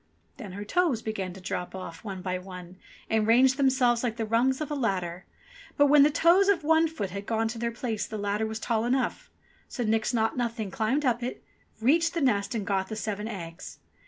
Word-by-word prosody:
Then 205 Hz, -8 st, -8 dB
her 205 Hz, +2 st, -6 dB
toes 315 Hz, -, +1 dB
began 195 Hz, -4 st, -3 dB
to 190 Hz, -, -11 dB
drop 180 Hz, 0 st, -4 dB
off 170 Hz, -3 st, -8 dB
one 195 Hz, -4 st, -6 dB
by 185 Hz, -1 st, -2 dB
one 180 Hz, -1 st, -10 dB, 0.3 s
and 220 Hz, -1 st, +1 dB
range 255 Hz, +3 st, +5 dB
them 270 Hz, -1 st, +3 dB
selves 245 Hz, -3 st, +2 dB
like 235 Hz, -2 st, -2 dB
the 225 Hz, -, -1 dB
rungs 240 Hz, +4 st, +2 dB
of 305 Hz, -1 st, -4 dB
a -, -, 0 dB
ladder; 185 Hz, -9 st, -2 dB, 0.5 s
but 285 Hz, -, +6 dB
when 290 Hz, 0 st, +6 dB
the 290 Hz, -, +7 dB
toes 345 Hz, +6 st, +4 dB
of 385 Hz, -5 st, +2 dB
one 320 Hz, +1 st, +4 dB
foot 210 Hz, -, -5 dB
had 200 Hz, +1 st, -6 dB
gone 225 Hz, 0 st, +1 dB
to 225 Hz, 0 st, -6 dB
their 235 Hz, 0 st, -1 dB
places 230 Hz, -3 st, -3 dB
the 215 Hz, -, -5 dB
ladder 205 Hz, +1 st, -1 dB
was 220 Hz, 0 st, -4 dB
tall 225 Hz, -1 st, 0 dB
enough. 260 Hz, +2 st, -1 dB, 0.4 s
So 245 Hz, -, -4 dB
Nix 220 Hz, 0 st, +1 dB
Naught 225 Hz, -2 st, +1 dB
Nothing 230 Hz, -4 st, -2 dB
climbed 260 Hz, +7 st, 0 dB
up 245 Hz, -1 st, +1 dB
it, 245 Hz, +1 st, -5 dB, 0.4 s
reached 325 Hz, +9 st, +3 dB
the -, -, +1 dB
nest 210 Hz, -5 st, +1 dB
and 210 Hz, -3 st, -2 dB
got 190 Hz, -2 st, 0 dB
the 220 Hz, -, -4 dB
seven 210 Hz, 0 st, -3 dB
eggs. 170 Hz, -5 st, -8 dB
225 Hz, 220 wpm, -27 LUFS, 200-260 Hz, 0.5 s, the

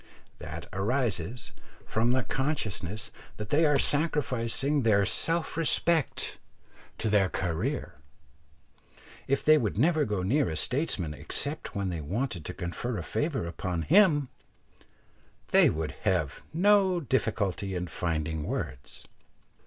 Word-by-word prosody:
That 80 Hz, +2 st, -7 dB
arises 110 Hz, 0 st, -1 dB, 0.3 s
from 115 Hz, +2 st, +1 dB
the 130 Hz, 0 st, +2 dB
consciousness 110 Hz, -, -3 dB, 0.3 s
that 105 Hz, 0 st, -6 dB
they 160 Hz, +3 st, +4 dB
are 145 Hz, -1 st, +4 dB
sacrificing 140 Hz, -2 st, +1 dB
their 105 Hz, -4 st, +3 dB
self 165 Hz, +9 st, +1 dB
respect 165 Hz, -1 st, +1 dB, 0.6 s
to 110 Hz, -, -2 dB
their 100 Hz, -3 st, +3 dB
"career." 85 Hz, -4 st, -2 dB, 1.3 s
If 140 Hz, -, 0 dB
they 155 Hz, 0 st, +7 dB
would 105 Hz, -6 st, -2 dB
never 155 Hz, +5 st, +3 dB
go 105 Hz, -3 st, -2 dB
near 135 Hz, +9 st, +2 dB
a 80 Hz, -, -3 dB
statesman 100 Hz, -, -1 dB
except 145 Hz, -, -3 dB
when 100 Hz, -2 st, -1 dB
they 85 Hz, -3 st, -3 dB
wanted 95 Hz, -, -3 dB
to -, -, -5 dB
confer 95 Hz, +6 st, -4 dB
a 85 Hz, -, -4 dB
favour 145 Hz, -, -2 dB
upon 85 Hz, 0 st, -3 dB
him, 155 Hz, -6 st, +4 dB, 1.2 s
they -, -, +6 dB
would 80 Hz, -1 st, -2 dB
have 90 Hz, -9 st, 0 dB
no 190 Hz, +1 st, +4 dB
difficulty 105 Hz, -, -1 dB
in 90 Hz, 0 st, -2 dB
finding 80 Hz, -3 st, -2 dB
words. 65 Hz, -3 st, -5 dB
110 Hz, 125 wpm, -28 LUFS, 90-145 Hz, 1.3 s, they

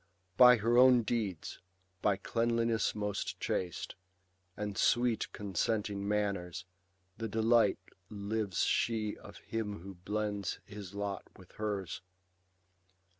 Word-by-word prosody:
By 125 Hz, +2 st, +9 dB
her 115 Hz, +3 st, +3 dB
own 125 Hz, -2 st, +7 dB
deeds, 105 Hz, -8 st, -2 dB, 0.4 s
hj 100 Hz, -2 st, +1 dB
cleanliness 115 Hz, -1 st, +1 dB
most 105 Hz, -1 st, -3 dB
chaste, 90 Hz, -2 st, -2 dB, 0.6 s
Ajid 105 Hz, -2 st, -3 dB
sweet 120 Hz, -2 st, +2 dB
consenting 100 Hz, +1 st, -1 dB
manners, 100 Hz, -4 st, -1 dB, 0.5 s
the 115 Hz, -, -2 dB
delight 110 Hz, 0 st, +3 dB, 0.3 s
Lives 105 Hz, -1 st, -1 dB
she 110 Hz, -2 st, +1 dB
of 100 Hz, -, -12 dB
him 105 Hz, -5 st, -4 dB
who 95 Hz, +2 st, -8 dB
blends 100 Hz, +1 st, -3 dB
his 100 Hz, -2 st, -9 dB
lot 100 Hz, -1 st, -3 dB
with 95 Hz, -1 st, -16 dB
hers. 100 Hz, -5 st, -3 dB
105 Hz, 110 wpm, -33 LUFS, 100-115 Hz, 0.6 s, By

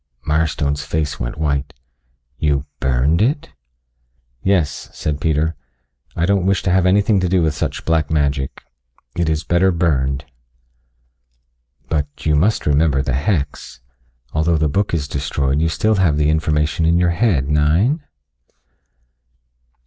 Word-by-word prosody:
Mirestone's 75 Hz, -2 st, 0 dB
face 80 Hz, -2 st, -2 dB
went -, -, -4 dB
white. 70 Hz, -3 st, -2 dB, 0.6 s
"You 70 Hz, -1 st, +1 dB
burned 65 Hz, +6 st, +1 dB
it?" 140 Hz, +6 st, 0 dB, 0.9 s
"Yes," 80 Hz, -4 st, 0 dB
said 75 Hz, -1 st, -3 dB
Peter. 80 Hz, +1 st, +1 dB, 0.6 s
"I 85 Hz, -, +1 dB
don't 95 Hz, -1 st, +1 dB
wish 95 Hz, -3 st, +1 dB
to 90 Hz, -, +1 dB
have 95 Hz, 0 st, +3 dB
anything 100 Hz, +2 st, +3 dB
to 90 Hz, -1 st, 0 dB
do 90 Hz, -1 st, +2 dB
with 80 Hz, -1 st, +1 dB
such -, -, -4 dB
black 80 Hz, -2 st, +1 dB
magic. 70 Hz, -3 st, -1 dB, 0.5 s
It 85 Hz, -2 st, 0 dB
is 80 Hz, 0 st, -1 dB
better 85 Hz, +3 st, +2 dB
burned." 70 Hz, -5 st, 0 dB, 1.6 s
"But 75 Hz, -3 st, 0 dB, 0.2 s
you 75 Hz, -, +2 dB
must 100 Hz, +9 st, +1 dB
remember 75 Hz, -2 st, +2 dB
the 65 Hz, -, -2 dB
hex. 70 Hz, -, -2 dB, 0.5 s
Although 80 Hz, +2 st, +2 dB
the 75 Hz, 0 st, +1 dB
book 100 Hz, +7 st, 0 dB
is 75 Hz, -3 st, -2 dB
destroyed 70 Hz, +1 st, -1 dB
you 80 Hz, -, +2 dB
still 110 Hz, +6 st, +1 dB
have 85 Hz, -6 st, +2 dB
the 75 Hz, 0 st, +2 dB
information 80 Hz, 0 st, 0 dB
in 85 Hz, +1 st, +3 dB
your 90 Hz, -1 st, +2 dB
head, 85 Hz, -, +1 dB
nein?" 80 Hz, -, +2 dB
80 Hz, 140 wpm, -19 LUFS, 70-85 Hz, 1.6 s, have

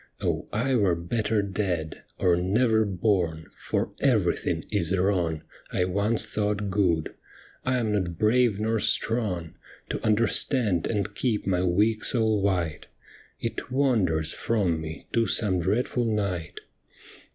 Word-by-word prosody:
Oh, -, -, -2 dB
I 125 Hz, +6 st, 0 dB
were 100 Hz, -8 st, +3 dB
better 105 Hz, +5 st, -1 dB
dead, 90 Hz, -5 st, -3 dB, 0.2 s
Or 90 Hz, -2 st, +3 dB
never 110 Hz, +5 st, +2 dB
born, 90 Hz, -5 st, 0 dB
for -, -, -2 dB
everything -, -, +1 dB
is 85 Hz, +4 st, 0 dB
wrong 90 Hz, -5 st, 0 dB, 0.3 s
I 90 Hz, -, +1 dB
once 100 Hz, +5 st, +1 dB
thought 105 Hz, -1 st, -2 dB
good. 90 Hz, -5 st, +1 dB, 0.5 s
I 130 Hz, 0 st, +1 dB
am 115 Hz, -3 st, 0 dB
not 90 Hz, -5 st, -1 dB
brave 110 Hz, 0 st, +3 dB
nor 110 Hz, +1 st, 0 dB
strong 100 Hz, -9 st, 0 dB, 0.4 s
To -, -, -4 dB
understand 110 Hz, -, +2 dB
and 105 Hz, -2 st, -2 dB
keep 110 Hz, 0 st, -1 dB
my 90 Hz, -2 st, +1 dB
weak 105 Hz, +5 st, +2 dB
soul 110 Hz, -4 st, +2 dB
white; 90 Hz, -6 st, -1 dB, 0.5 s
It -, -, -4 dB
wanders 100 Hz, -, +2 dB
from 95 Hz, -8 st, 0 dB
me 80 Hz, 0 st, -7 dB
to 115 Hz, -1 st, +2 dB
some 95 Hz, -5 st, +1 dB
dreadful 115 Hz, +7 st, 0 dB
night. 100 Hz, -7 st, -2 dB
100 Hz, 130 wpm, -26 LUFS, 90-110 Hz, 0.5 s, were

